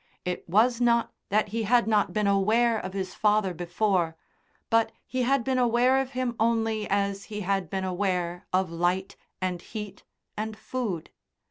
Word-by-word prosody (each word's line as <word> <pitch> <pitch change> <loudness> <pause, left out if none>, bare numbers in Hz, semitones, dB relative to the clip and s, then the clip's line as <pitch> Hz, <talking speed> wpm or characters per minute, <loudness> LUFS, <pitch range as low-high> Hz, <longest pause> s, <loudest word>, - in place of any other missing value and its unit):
It 180 -1 -4
was 230 +6 +3
not 235 -1 +3 0.2
that 210 +1 +2
he 225 +3 -2
had 235 +3 +3
not 210 -2 +2
been 210 -1 0
aware 220 +4 +3
of 185 -1 -6
his 190 -1 -3
father 210 -3 +2
before, 175 0 0 0.6
but 225 0 +3
he 255 - -2
had 260 +1 +2
been 260 0 0
aware 245 +2 +4
of 270 0 -6
him 250 -2 -1
only 225 -1 +1
as 200 0 0
he 210 -1 -5
had 195 -3 -1
been 190 -1 -2
aware 180 -2 -2
of 185 -2 +1
light 175 +3 0 0.3
and 180 -2 -1
heat 210 -2 -7 0.3
and 215 0 -4
food. 220 -8 -4
210 Hz, 165 wpm, -27 LUFS, 185-230 Hz, 0.6 s, aware